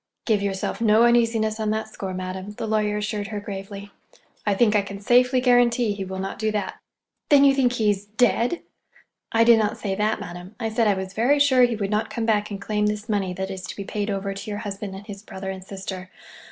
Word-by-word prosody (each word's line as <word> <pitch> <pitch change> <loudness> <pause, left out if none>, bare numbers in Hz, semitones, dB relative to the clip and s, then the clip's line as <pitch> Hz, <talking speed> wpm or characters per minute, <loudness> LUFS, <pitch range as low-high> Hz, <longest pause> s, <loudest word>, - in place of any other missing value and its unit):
"Give 215 -3 +2
yourself 195 +2 -2
no 220 0 +5
uneasiness 230 -2 +2
on 215 -1 -1
that 220 0 -1
score, 190 -3 -6
madam," 185 +2 -5
the 215 - -5
lawyer 210 -1 0
assured 210 -1 -3
her 210 -1 -4
gravely. 200 0 -7 0.6
"I 205 - +3
think 215 0 +3
I 205 - +5
can 200 0 -8
safely 250 +4 +4
guarantee 245 -2 +3
he 200 -1 -5
will 190 0 -6
not 190 +1 -5
do 220 0 0
that." 210 - -3 0.5
"Then 285 -1 +7
you 275 -1 +6
think 255 -3 +2
he's—dead?" 220 - +1 0.7
"I 230 0 +4
did 230 -1 +6
not 210 -1 0
say 195 -2 -3
that, 210 +2 0
madam. 175 +4 -9
I 225 -2 -1
said 225 0 +1
I 205 - +3
was 190 0 -5
very 245 +8 +3
sure 280 -3 +4
he 240 -1 -1
would 200 -2 -3
not 210 +1 0
come 230 -2 -3
back 210 -2 +1
and 200 -2 -5
claim 210 +1 0
this 210 +1 -3
money 200 -3 0
that 190 +2 -4
is 190 -1 -6
to - - -7
be 200 - -5
paid 205 +1 -3
over 195 0 -2
to 195 +2 -7
your 205 0 -4
husband 200 -1 -5
and 195 +2 -10
his 200 -1 -8
brother 190 -2 -6
and 190 -1 -8
sister. 190 -1 -7
210 Hz, 230 wpm, -24 LUFS, 195-225 Hz, 0.7 s, Then